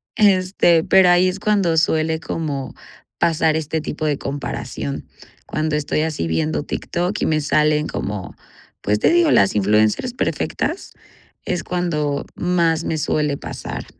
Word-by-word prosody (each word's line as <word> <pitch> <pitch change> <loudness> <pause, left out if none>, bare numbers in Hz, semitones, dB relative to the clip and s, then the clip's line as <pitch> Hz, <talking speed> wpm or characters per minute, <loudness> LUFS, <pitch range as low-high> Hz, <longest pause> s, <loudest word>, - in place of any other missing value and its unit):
este, 185 -5 +3
pero 190 -2 +5
ahí 175 +1 +5
es 185 +1 -2
cuando 200 -6 +1
suele 160 0 +1
como 145 -4 -4 0.4
pasar 160 -2 +2
este 160 0 -2
tipo 155 0 -4
de 145 -2 +1
comparación, 135 - -5 0.4
cuando 155 0 -1
estoy 150 0 -1
así 155 - -2
viendo 80 -2 -1
TikTok 180 +4 -3
y - - +2
me 155 -1 +1
salen 150 +1 +2
como, 100 -2 -5 0.5
pues 105 +1 0
te - - +3
digo, 345 -2 +4
las 100 +1 +4
influencers 105 - +2
perfectas, - - -2 0.5
es 180 - -2
cuando 155 -5 -2
más 170 -2 +1
me 160 - -2
suele 150 -1 0
pasar. - - -6
155 Hz, 140 wpm, -20 LUFS, 140-175 Hz, 0.5 s, pero